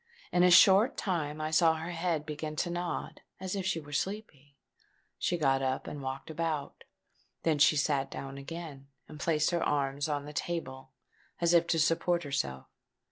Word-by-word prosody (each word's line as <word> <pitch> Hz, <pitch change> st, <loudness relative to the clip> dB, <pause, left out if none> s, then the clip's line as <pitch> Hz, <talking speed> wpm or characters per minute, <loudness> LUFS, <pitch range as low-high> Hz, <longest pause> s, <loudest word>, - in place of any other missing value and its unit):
In 175 Hz, -, +3 dB
a 180 Hz, -, +6 dB
short 190 Hz, +6 st, +7 dB
time 155 Hz, -6 st, -2 dB
I 155 Hz, 0 st, -2 dB
saw 160 Hz, 0 st, +4 dB
her 160 Hz, +2 st, -5 dB
head 165 Hz, -3 st, -1 dB
begin 155 Hz, 0 st, -5 dB
to 175 Hz, +3 st, -1 dB
nod 175 Hz, 0 st, -4 dB, 0.2 s
as 190 Hz, +1 st, -4 dB
if 190 Hz, -2 st, -2 dB
she 165 Hz, -, 0 dB
was 145 Hz, -2 st, -2 dB
sleepy: 150 Hz, -9 st, -7 dB, 0.6 s
she 175 Hz, -, 0 dB
got 135 Hz, -4 st, +2 dB
up, 130 Hz, 0 st, -1 dB
and 145 Hz, -, -6 dB
walked 135 Hz, +3 st, -5 dB
about. 155 Hz, -3 st, -3 dB, 0.6 s
Then 155 Hz, -3 st, +1 dB
she 155 Hz, -, +6 dB
sate 140 Hz, -2 st, +1 dB
down 135 Hz, 0 st, -7 dB
again, 145 Hz, -2 st, -8 dB, 0.2 s
and 150 Hz, -, -11 dB
placed 155 Hz, +1 st, +1 dB
her 170 Hz, -1 st, 0 dB
arms 140 Hz, 0 st, 0 dB
on 145 Hz, -1 st, -2 dB
the 150 Hz, -, -9 dB
table 135 Hz, -6 st, -4 dB, 0.5 s
as 170 Hz, 0 st, +2 dB
if 170 Hz, 0 st, +4 dB
to 165 Hz, -, +1 dB
support 170 Hz, +2 st, +2 dB
herself. 70 Hz, -, -3 dB
155 Hz, 180 wpm, -30 LUFS, 140-170 Hz, 0.6 s, short